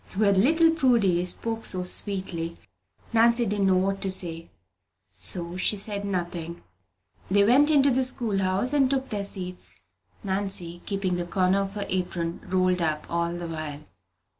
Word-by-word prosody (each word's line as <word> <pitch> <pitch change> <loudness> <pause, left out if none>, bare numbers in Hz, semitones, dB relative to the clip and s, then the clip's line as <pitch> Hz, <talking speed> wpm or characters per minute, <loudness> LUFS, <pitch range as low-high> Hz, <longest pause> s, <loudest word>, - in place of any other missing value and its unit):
When 200 -2 +3
little 325 +7 +4
Prudy 235 - +2
spoke 225 +4 -1
so 185 -1 +2
sweetly, 180 -3 0 0.6
Nancy 235 +1 +3
didn't 200 -1 0
know 185 -1 +3
what 195 +1 -1
to 195 - -1
say; 170 -3 +1 0.6
so 175 - -5
she 200 - +3
said 205 0 0
nothing. 175 -3 -4 0.7
They 200 +2 +4
went 265 +8 +4
into 280 -2 +4
the 260 +1 +1
school 235 -6 +1
house 190 +8 0
and 275 -3 +3
took 265 -1 -1
their 205 -3 -3
seats, 180 - -5 0.5
Nancy 190 -3 -2
keeping 195 -3 -1
the 175 - -3
corner 185 +2 +1
of 195 +1 -5
her 205 - -3
apron 175 -2 -3
rolled 185 -1 +1
up 155 -2 -1
all 170 0 -1
the 175 0 -6
while. 155 -2 -6
190 Hz, 160 wpm, -25 LUFS, 175-215 Hz, 0.7 s, little